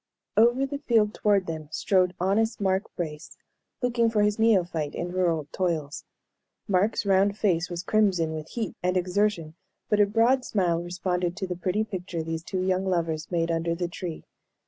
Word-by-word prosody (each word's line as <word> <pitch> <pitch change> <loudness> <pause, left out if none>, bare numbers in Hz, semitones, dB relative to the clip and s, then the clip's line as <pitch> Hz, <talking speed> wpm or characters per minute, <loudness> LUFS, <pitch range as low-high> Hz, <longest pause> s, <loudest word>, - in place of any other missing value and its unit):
Over 240 +4 +4
the 280 +1 -5
field 225 -6 +2
toward 200 -3 +2
them 160 -2 -5
strode 185 +1 +1
honest 215 +5 +1
Mark 190 0 +1
Brace, 155 -4 -6 0.5
looking 235 -2 +2
for 215 -2 +2
his 210 +1 +1
neophyte 175 -9 +2
in 175 +1 -3
rural 170 -5 0
toils. 160 -6 -2 0.6
Mark's 205 +2 +1
round 200 +1 +3
face 180 -5 +1
was 175 0 -4
crimson 190 -6 +2
with 155 0 -6
heat 225 -4 -4
and 180 +1 +1
exertion, 180 -3 0 0.4
but 210 - +2
a 205 - +5
broad 230 +5 +3
smile 175 -7 0
responded 180 0 -2
to 195 - -2
the 180 -1 -4
pretty 185 +4 0
picture 185 -5 -5
these 165 0 -4
two 185 +2 -3
young 185 0 0
lovers 165 -3 -1
made 170 -1 0
under 165 0 0
the 175 +1 -2
tree. 170 -1 -6
185 Hz, 170 wpm, -26 LUFS, 170-210 Hz, 0.6 s, a